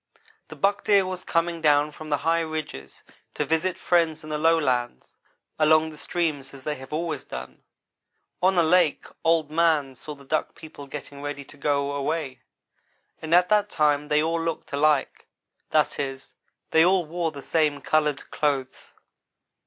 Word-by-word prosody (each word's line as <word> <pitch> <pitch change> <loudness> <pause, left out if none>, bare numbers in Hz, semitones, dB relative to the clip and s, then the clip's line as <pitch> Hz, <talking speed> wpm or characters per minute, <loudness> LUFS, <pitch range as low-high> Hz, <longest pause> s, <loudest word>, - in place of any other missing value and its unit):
The - - -10
buck 200 +1 +1
deer 200 -3 +4
was 185 -1 -5
coming 165 0 -1
down 150 -1 +3
from 155 +1 -10
the 145 - +2
high 165 +1 +3
ridges 155 - -6 0.3
to - - -1
visit 165 +3 0
friends 165 -3 +1
in 155 - -8
the 150 - -1
lowlands 130 - +1 0.5
along 155 +1 +4
the - - -12
streams 150 -5 -2
as 135 - -13
they 150 - -2
have 130 0 -12
always 155 -2 -3
done. 65 0 -9 0.8
On 185 0 +3
a 170 - +5
lake 170 -1 +3 0.2
Old 165 -2 +2
man 155 -4 +2
saw 150 +4 -9
the 140 -1 -17
Duck 155 +3 -1
people 155 -3 -11
getting 140 0 -8
ready 145 -1 -5
to - - -15
go 140 0 0
away, 140 -2 -3 0.8
and 160 +1 +2
at 180 0 +4
that 210 -1 +3
time 150 -1 +1
they 150 0 +2
all 165 +1 0
looked 165 -3 -4
alike; 145 -1 +1 0.4
that - - +1
is, 135 -1 -5 0.4
they 160 - +6
all 180 0 +3
wore 165 +1 -2
the 140 -2 -10
same 150 -3 +1
colored 150 -2 0
clothes. 140 -3 -2
155 Hz, 170 wpm, -25 LUFS, 145-165 Hz, 0.8 s, they